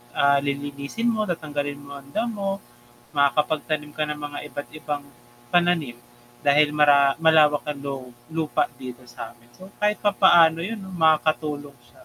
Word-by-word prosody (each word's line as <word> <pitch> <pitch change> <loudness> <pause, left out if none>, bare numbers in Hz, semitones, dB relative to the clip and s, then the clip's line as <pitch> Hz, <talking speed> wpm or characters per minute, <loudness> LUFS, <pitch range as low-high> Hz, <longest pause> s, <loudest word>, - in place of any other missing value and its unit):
ah, 140 0 +4
lilinisin 140 +10 -2
mo, 215 -1 0
tatanggalin 145 -4 -3
mo 140 0 -13
ang 140 0 -14
damo, 200 -4 -2 0.6
makakapagtanim 150 +1 +1
ka 155 - +1
ng 150 0 -4
mga 145 -1 -6
iba't-ibang 145 0 -5 0.5
pananim, 175 -7 +2 0.5
dahil 145 +1 +5
mara 140 -2 +5
malawak 155 -3 +4
ang 150 -1 -3
lu 140 -1 -3 0.3
lupa 160 -1 0
dito 125 -1 -9
samin. 120 0 -11
So, 190 +1 -13
kahit 210 0 +1
papaano 175 -5 +5
yun 215 +5 -4
'no 190 -1 -10
makakatulong 155 -3 +1
siya. - - -20
150 Hz, 140 wpm, -24 LUFS, 140-165 Hz, 0.6 s, dahil